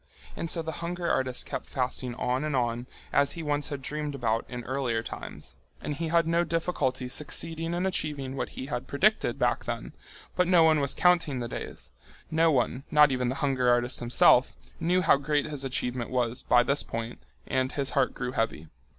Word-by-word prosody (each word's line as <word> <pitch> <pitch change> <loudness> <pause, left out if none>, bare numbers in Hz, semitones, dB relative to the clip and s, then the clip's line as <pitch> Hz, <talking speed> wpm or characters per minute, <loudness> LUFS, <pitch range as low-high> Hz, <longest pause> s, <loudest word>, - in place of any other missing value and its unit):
And 165 - -4
so 165 -1 0
the 160 - -3
hunger 175 0 -3
artist 130 -1 -1
kept - - -5
fasting 125 -1 -2
on 125 +3 -1
and 155 -2 -1
on, 120 -1 -1 0.3
as 140 0 +3
he 170 - -6
once 145 -1 -1
had 140 -2 -5
dreamed 150 0 -4
about 115 -4 0
in 125 -1 -6
earlier 125 -3 -1
times, - - -9 0.2
and - - -4
he 165 +3 -3
had 165 +1 +3
no 170 +1 +2
difficulty 145 -7 -1
succeeding 165 +5 -2
in 180 +2 -1
achieving 145 -7 -1
what 135 - -3
he 130 - -4
had 125 -3 -4
predicted 210 +10 +2
back - - 0
then, - - -5 0.4
but 180 -1 +2
no 175 -2 +6
one 160 -1 +5
was 140 -2 0
counting 170 -6 +3
the 120 - -3
days—no 160 +6 -3
one, 125 -1 0
not 150 -2 +6
even 125 -1 0
the 130 - -2
hunger 130 -3 +2
artist 120 +1 +2
himself, 120 +1 +5 0.2
knew 180 +2 +2
how 160 - +5
great 145 +1 0
his 145 -3 -4
achievement 125 -2 -2
was 125 -1 -1
by 120 0 +4
this 140 +3 +1
point, 115 +1 -5 0.3
and 130 0 -1
his 140 -2 -2
heart 135 -2 +1
grew 125 0 -3
heavy. 95 -10 -2
140 Hz, 195 wpm, -28 LUFS, 125-160 Hz, 0.4 s, no